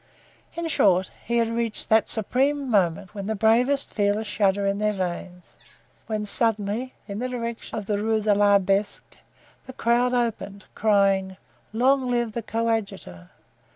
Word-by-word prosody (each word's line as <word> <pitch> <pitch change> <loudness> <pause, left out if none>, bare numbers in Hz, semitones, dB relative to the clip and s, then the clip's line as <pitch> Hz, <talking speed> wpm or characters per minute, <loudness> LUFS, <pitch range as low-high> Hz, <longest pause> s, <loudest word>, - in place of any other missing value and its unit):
In 335 0 -3
short, 190 - +2
he 235 - 0
had 230 -1 +2
reached 230 -1 -3
that 220 0 +3
supreme 270 +6 0
moment 185 -2 +1
when 200 -2 -6
the 220 - -1
bravest 240 +6 +2
feel 205 -1 +1
a 220 - -3
shudder 200 -2 0
in 200 +1 0
their 210 0 +1
veins, 180 -1 -6 0.5
when 215 -1 -2
suddenly, 220 +3 -1
in 200 0 -5
the 255 +1 -2
direction 235 -2 -5
of 210 - -5
the 205 0 -1
Rue 220 0 +1
de 210 -1 +2
l'Arbre 200 -1 +3
Sec, - - -14 0.5
the 260 - -8
crowd 245 +1 +1
opened, 205 -4 -3
crying: 195 -3 +2 0.3
"Long 255 +3 +2
live 240 -2 0
the 235 - -4
coadjutor!" 210 - -3
215 Hz, 155 wpm, -24 LUFS, 200-235 Hz, 0.5 s, that